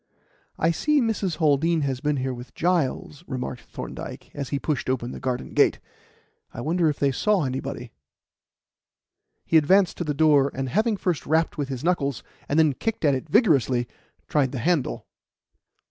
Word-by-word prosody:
"I 165 - +2
see 300 - +2
Mrs. 215 - 0
Haldean 160 +1 +2
has 135 -3 -1
been 150 +1 0
here 130 0 -2
with 120 0 -10
Giles," 170 -3 -1
remarked 125 -1 -4
Thorndyke, - - -8
as 140 -2 -5
he 140 - -1
pushed 140 -2 -2
open 125 -1 -1
the - - -7
garden 130 -1 -3
gate. - - +3 0.7
"I - - -9
wonder 165 +5 +1
if 145 - -2
they 140 -1 +2
saw 200 +6 +1
anybody." 130 -2 -4 1.5
He 165 - +4
advanced 185 +5 +4
to - - -2
the 150 -3 -2
door, 145 -3 +4
and 135 0 -3
having 215 - +1
first 180 -5 -2
rapped 160 +2 +1
with 145 -3 -3
his 130 0 -5
knuckles 140 -7 0 0.3
and 145 - +1
then 155 -3 +4
kicked 225 - -3
at 145 - +4
it 130 - -4
vigorously, 135 - +3 0.4
tried 140 -3 +1
the - - -3
handle. 155 +2 0
145 Hz, 170 wpm, -24 LUFS, 130-170 Hz, 1.5 s, He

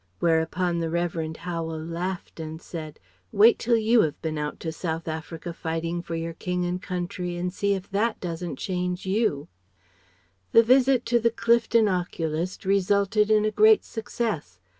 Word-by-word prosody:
Whereupon 170 +1 +1
the 165 - -1
Revd. 165 -1 -2
Howel 165 -2 -4
laughed 170 +3 -5
and 160 0 -6
said: 155 -3 -8 0.3
"Wait 220 +3 +6
till 235 0 +2
you 225 +1 +4
have 150 -2 -1
been 160 -1 -2
out 150 0 -4
to 160 - -3
South 165 0 -4
Africa 160 +1 -5
fighting 165 +1 -3
for 170 -1 -5
your 165 0 -3
king 180 +1 -2
and 180 +1 -2
country 180 -1 -4
and 180 +1 -2
see 200 0 +1
if 190 0 -6
that 215 +3 0
doesn't 170 -1 -4
change 180 -1 -3
you!" 190 -7 0 1.1
The 230 - +8
visit 255 +1 +4
to 240 0 +3
the 230 0 +3
Clifton 230 -1 +3
oculist 175 -2 -2
resulted 200 +2 +2
in 215 -1 +4
a 215 - +1
great 215 +1 +5
success. 210 - -4
180 Hz, 160 wpm, -25 LUFS, 165-210 Hz, 1.1 s, The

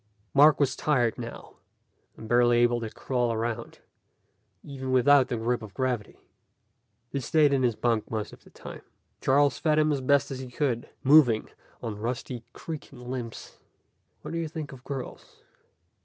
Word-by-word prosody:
Mark 150 +2 +6
was 140 -2 +2
tired 120 -7 +1
now, - - -9 0.6
and 110 - -9
barely 120 0 +4
able 120 0 +3
to 115 - -4
crawl 125 +1 -1
around, 115 0 -3 0.9
even 130 -2 -6
without 130 +1 +5
the 120 - -2
grip 120 +2 -1
of 105 -3 -11
gravity. 125 -5 -2 0.9
He 140 - -2
stayed 145 +2 +3
in 135 - +2
his 120 -3 +1
bunk 115 -2 0
most 110 -2 -4
of - - -15
the - - -18
time. - - -10 0.4
Charles 140 0 +3
fed 155 -2 +2
him 155 0 +3
as 140 -2 -1
best 140 +2 +2
he 130 -1 -6
could, 125 -2 -2
moving 135 -6 +5 0.3
on 105 -3 -4
rusty, 120 +1 -4
creaking 135 -6 -8
limbs. 120 -3 -7 0.6
"What - - -6
do 165 - -2
you 165 - -2
think 155 -2 -6
of 130 -2 -12
girls?" 135 -2 -7
130 Hz, 160 wpm, -27 LUFS, 120-140 Hz, 0.9 s, Mark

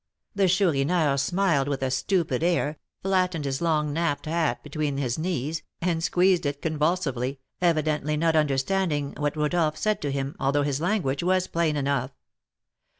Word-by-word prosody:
The 195 -1 +2
Chourineur 165 -4 +2
smiled 150 -1 +1
with 140 -2 -2
a 130 - 0
stupid 155 0 0
air, 165 -3 0 0.2
flattened 185 -5 +1
his 135 +1 -2
long 155 -3 +1
napped 165 -2 -1
hat 160 0 0
between 150 -1 -2
his 130 -1 -1
knees, 160 -2 -2 0.2
and 165 -2 -1
squeezed 180 -2 +3
it 145 0 -3
convulsively, 150 -5 -1 0.2
evidently 155 -3 +1
not 165 +1 +2
understanding 150 +1 +1
what 145 +1 -1
Rodolph 155 0 +1
said 215 -1 0
to 145 - -2
him, 135 +1 -3
although 140 +2 +1
his 145 0 -1
language 170 -8 0
was 185 +1 +2
plain 165 -4 0
enough. 140 -2 0
155 Hz, 150 wpm, -26 LUFS, 140-175 Hz, 0.2 s, squeezed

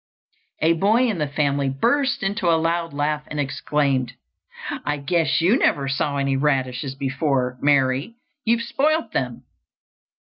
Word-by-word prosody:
A 165 +1 +5
boy 215 +9 +3
in 210 -7 -2
the 150 - 0
family 140 -1 0
burst 245 - +1
into 195 -2 0
a 165 - +4
loud 165 +1 -1
laugh 150 +1 -1
and 150 - -5
exclaimed, 140 -2 0 0.7
"I 145 0 -1
guess 155 0 +1
you 200 +10 +3
never 140 -1 +2
saw 140 +1 -1
any 140 -1 0
radishes 135 -2 -1
before, 135 -2 -1
Mary; 140 - +2 0.3
you've 230 +1 +1
spoilt 310 +7 0
them." - - -3
150 Hz, 140 wpm, -22 LUFS, 135-175 Hz, 0.7 s, A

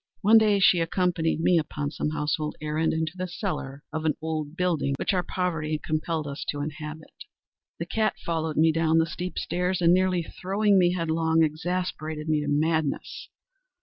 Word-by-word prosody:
One 220 +3 +7
day 210 -2 +3
she 185 -2 +5
accompanied 165 -1 0
me, 170 0 +4
upon 150 -2 -3
some 150 - -2
household 150 0 -2
errand, 155 +1 0
into 160 -1 -1
the 185 0 -3
cellar 175 - -5
of 160 - -2
the 155 -1 +1
old 155 -1 -4
building 170 -6 0
which - - 0
our 185 - +2
poverty 165 -4 -2
compelled 155 0 -1
us 140 -1 -5
to 145 - -2
inhabit. 150 +1 -7 0.6
The 170 - -4
cat 215 +4 0
followed 160 -2 -2
me 160 +1 +5
down 160 0 +2
the 165 - +4
steep 180 +2 -6
stairs, 180 +1 -1
and, 170 0 +5
nearly 185 -1 +2
throwing 195 +4 +1
me 175 -1 +3
headlong, 165 -1 +1
exasperated 155 -1 -2
me 155 -1 +2
to 150 - -4
madness. 155 0 -1
160 Hz, 175 wpm, -26 LUFS, 155-180 Hz, 0.6 s, One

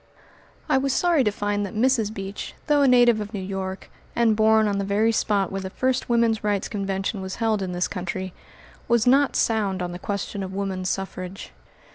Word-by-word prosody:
I - - +3
was 275 0 0
sorry 340 -4 +3
to 210 - +2
find 205 0 -1
that 200 - -6
Mrs. 225 -2 +2
Beach, 195 -1 -6
though 295 -2 +3
a 280 - +5
native 240 -3 +5
of 210 +1 -6
New - - -3
York, 190 0 -5 0.2
and 230 -2 +3
born 220 0 +4
on 200 -1 0
the - - -1
very 205 +3 +2
spot 205 -3 0
where 195 0 -3
the 190 - -5
first 255 +6 -1
woman's 230 -2 +2
rights 205 -2 0
convention 195 0 -3
was 190 0 -5
held 225 -3 0
in 185 -1 -3
this 180 0 0
country, 185 0 -4 0.5
was 235 -1 +3
not 275 +2 +4
sound 205 -4 +1
on 180 -1 -3
the 175 - -7
question 200 +1 -4
of 190 0 -5
woman 190 -2 -3
suffrage. 190 +1 -4
205 Hz, 200 wpm, -24 LUFS, 195-230 Hz, 0.5 s, a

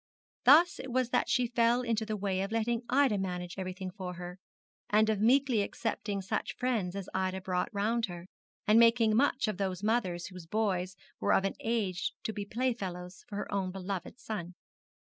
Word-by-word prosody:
Thus 320 +7 +7
it 260 - -6
was 250 -1 +1
that - - +1
she 255 -2 +3
fell 240 +1 +2
into 225 -2 -1
the 215 -1 -2
way 190 -1 -1
of 195 +2 -3
letting 230 +1 0
Ida 260 -6 +3
manage 180 -1 -4
everything 185 0 -4
for 185 -2 -6
her, 180 +1 -8 0.5
and 215 +1 +4
of 210 -2 -1
meekly 250 0 +4
accepting 205 -1 -3
such 185 - -2
friends 220 -8 -1
as 195 -2 -5
Ida 190 0 -1
brought 185 +1 -1
round 225 +2 0
her, 175 -1 -8 0.4
and 220 +1 +6
making 230 -2 +5
much 265 0 +2
of 210 -3 -2
those 190 -1 -2
mothers 200 -6 0
whose 180 -3 -10
boys 190 -2 0 0.2
were - - +2
of 190 - +3
an 195 - 0
age 210 -6 -1
to 220 - -2
be 205 -1 -4
play 250 +4 0
fellows 180 -4 -7
for 210 - -8
her 205 - -4
own 195 -2 0
beloved 190 +4 -5
son. 180 -5 -5
205 Hz, 190 wpm, -31 LUFS, 185-230 Hz, 0.5 s, Thus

